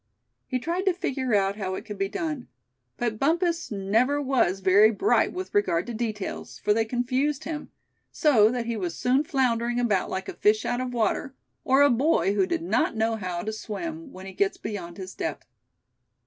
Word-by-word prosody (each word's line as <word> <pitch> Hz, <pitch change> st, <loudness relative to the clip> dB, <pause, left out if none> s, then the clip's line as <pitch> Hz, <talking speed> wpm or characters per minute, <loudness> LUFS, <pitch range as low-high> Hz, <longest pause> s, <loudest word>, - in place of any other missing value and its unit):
He 255 Hz, -, -1 dB
tried 340 Hz, +9 st, -2 dB
to 370 Hz, -, +3 dB
figure 260 Hz, -9 st, -1 dB
out 195 Hz, 0 st, +1 dB
how 190 Hz, -3 st, -3 dB
it -, -, -7 dB
could 210 Hz, -2 st, -7 dB
be 195 Hz, 0 st, 0 dB
done; 305 Hz, -, -4 dB, 0.5 s
but 230 Hz, -3 st, -2 dB
Bumpus 335 Hz, +3 st, +1 dB
never 220 Hz, +8 st, +1 dB
was 255 Hz, -9 st, +1 dB
very 195 Hz, +3 st, +6 dB
bright 230 Hz, -, +2 dB
with 370 Hz, +1 st, -6 dB
regard 295 Hz, -, +2 dB
to 240 Hz, -, -5 dB
details, 215 Hz, -3 st, -4 dB
for 210 Hz, -, +2 dB
they 225 Hz, +1 st, +1 dB
confused 260 Hz, +5 st, -1 dB
him; 305 Hz, -2 st, -5 dB, 0.4 s
so 230 Hz, -9 st, +4 dB
that 245 Hz, 0 st, -2 dB
he 230 Hz, 0 st, -2 dB
was 180 Hz, -5 st, -3 dB
soon 255 Hz, +3 st, +2 dB
floundering 245 Hz, -6 st, 0 dB
about 215 Hz, -6 st, +1 dB
like 190 Hz, 0 st, -4 dB
a -, -, -5 dB
fish 215 Hz, +1 st, +2 dB
out 245 Hz, +1 st, -1 dB
of 255 Hz, -1 st, -3 dB
water; 245 Hz, +3 st, -1 dB, 0.3 s
or 270 Hz, +2 st, +5 dB
a 285 Hz, -, +5 dB
boy 245 Hz, -5 st, +2 dB
who 195 Hz, -2 st, +2 dB
did 165 Hz, -, -1 dB
not 215 Hz, +6 st, +1 dB
know 225 Hz, +1 st, +1 dB
how 180 Hz, -5 st, -4 dB
to 220 Hz, -, -3 dB
swim, 315 Hz, +8 st, -6 dB
when 185 Hz, +1 st, -10 dB
he 190 Hz, -, -8 dB
gets 195 Hz, +1 st, 0 dB
beyond 180 Hz, -5 st, -6 dB
his 190 Hz, -1 st, -7 dB
depth. 155 Hz, -, -4 dB
230 Hz, 195 wpm, -26 LUFS, 200-275 Hz, 0.5 s, very